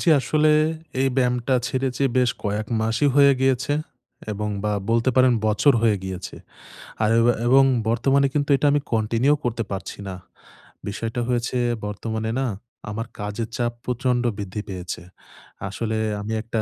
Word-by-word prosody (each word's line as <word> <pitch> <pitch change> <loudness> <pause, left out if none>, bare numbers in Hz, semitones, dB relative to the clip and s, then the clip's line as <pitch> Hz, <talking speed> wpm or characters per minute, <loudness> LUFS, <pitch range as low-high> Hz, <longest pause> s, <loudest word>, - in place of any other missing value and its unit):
জ্বি, - - 0
আসলে 155 +3 +2 0.5
এই 135 - +3
ব্যায়ামটা 125 0 +1
ছেড়েছি 130 0 -2
বেশ 125 -1 +4
কয়েক 105 +1 -1
মাসই 115 +6 +2
হয়ে 140 -1 +7
গিয়েছে। 130 +1 +2 0.6
এবং 105 +1 -3 0.2
বা 105 - +1 0.2
বলতে 115 +2 +3
পারেন 130 -1 +6
বছর 110 +7 +4
হয়ে 110 -3 +4
গিয়েছে। 95 -1 -6 0.7
আর 105 - +3
এবা 120 +1 +4
এবং 135 +2 +6 0.3
বর্তমানে 135 +4 +3
কিন্তু 145 -1 0
এটা 140 - 0
আমি 145 0 +2
কন্টিনিউ 115 +5 +2
করতে 120 -1 -1
পারছি 95 +1 -5
না। 95 - -5 0.7
বিষয়টা 115 +3 -3
হয়েছে 125 0 -1 0.3
বর্তমানে 110 +2 -3
না 135 - 0 0.4
আমার 115 +2 -4
কাজের 105 +2 -4
চাপ 120 -1 0
প্রচন্ড 125 0 0
বৃদ্ধি 100 +1 -4
পেয়েছে। 90 -3 -5 0.7
আসলে 110 +2 -3 0.2
আমি 110 +2 -4
একটা 115 -1 -2
115 Hz, 150 wpm, -23 LUFS, 105-130 Hz, 0.7 s, হয়ে